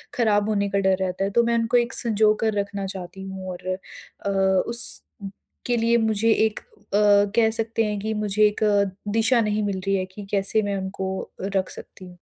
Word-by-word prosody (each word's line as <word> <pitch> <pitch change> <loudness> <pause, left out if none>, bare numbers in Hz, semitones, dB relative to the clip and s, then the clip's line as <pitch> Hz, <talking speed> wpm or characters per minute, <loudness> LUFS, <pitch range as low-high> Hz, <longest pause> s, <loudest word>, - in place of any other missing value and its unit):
ख़राब 215 -3 +2
होने 200 -1 0
का 200 0 0
डर 190 -1 +3
रहता 185 0 -1
है, 195 - 0
तो 235 +3 +3
मैं 235 0 +1
उनको 230 +1 +2
एक 235 -1 0
संजोकर 215 -1 +2
रखना 200 0 -3
चाहती 190 0 -7
हूँ। 190 -1 -7
और 180 0 -9
अ, 195 - -10 0.4
उसके 235 0 -3
लिए 230 +1 +3
मुझे 220 +1 +2
एक 220 -1 +1
अ, - - -26 0.7
कह 225 -1 +4
सकते 225 0 0
हैं 210 -1 -2
कि 220 +2 -2
मुझे 210 0 0
एक 210 - -4 0.5
दिशा 230 +2 +3
नहीं 210 -1 0
मिल 200 -2 -2
रही 195 - +2
है 185 -1 -1
कि 205 - -8
कैसे 200 +2 +2
मैं 205 -1 -2
उनको 190 0 -4
रख 195 0 -1
सकती 185 - -10
हूँ। 180 -1 -13
205 Hz, 190 wpm, -23 LUFS, 195-225 Hz, 0.7 s, कह